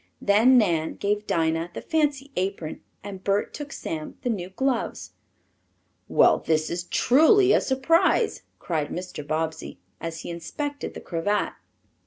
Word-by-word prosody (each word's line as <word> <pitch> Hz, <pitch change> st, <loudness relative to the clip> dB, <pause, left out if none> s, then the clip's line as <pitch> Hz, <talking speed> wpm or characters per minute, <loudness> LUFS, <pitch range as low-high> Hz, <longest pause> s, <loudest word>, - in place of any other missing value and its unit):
Then 225 Hz, +6 st, +5 dB
Nan 170 Hz, -8 st, +1 dB
gave 210 Hz, +1 st, -1 dB
Dinah 165 Hz, +1 st, 0 dB
the -, -, -4 dB
fancy 285 Hz, -3 st, 0 dB
apron 185 Hz, -4 st, -3 dB, 0.2 s
and 195 Hz, -2 st, -8 dB
Bert 200 Hz, +1 st, 0 dB
took 290 Hz, -2 st, -7 dB
Sam 155 Hz, -, -6 dB
the 245 Hz, -, +1 dB
new 185 Hz, -4 st, -4 dB
gloves. 255 Hz, +4 st, -2 dB, 1.0 s
"Well -, -, +4 dB
this 155 Hz, -1 st, 0 dB
is 175 Hz, +1 st, -3 dB
truly 320 Hz, -, +5 dB
a -, -, +4 dB
surprise!" 330 Hz, -, +2 dB, 0.2 s
cried 155 Hz, -4 st, -2 dB
Mr. 180 Hz, -3 st, -6 dB
Bobbsey, 160 Hz, +1 st, -3 dB, 0.2 s
as 165 Hz, 0 st, -5 dB
he -, -, -6 dB
inspected 285 Hz, -, -5 dB
the -, -, -7 dB
cravat. 195 Hz, +5 st, -1 dB
200 Hz, 140 wpm, -25 LUFS, 165-265 Hz, 1.0 s, Then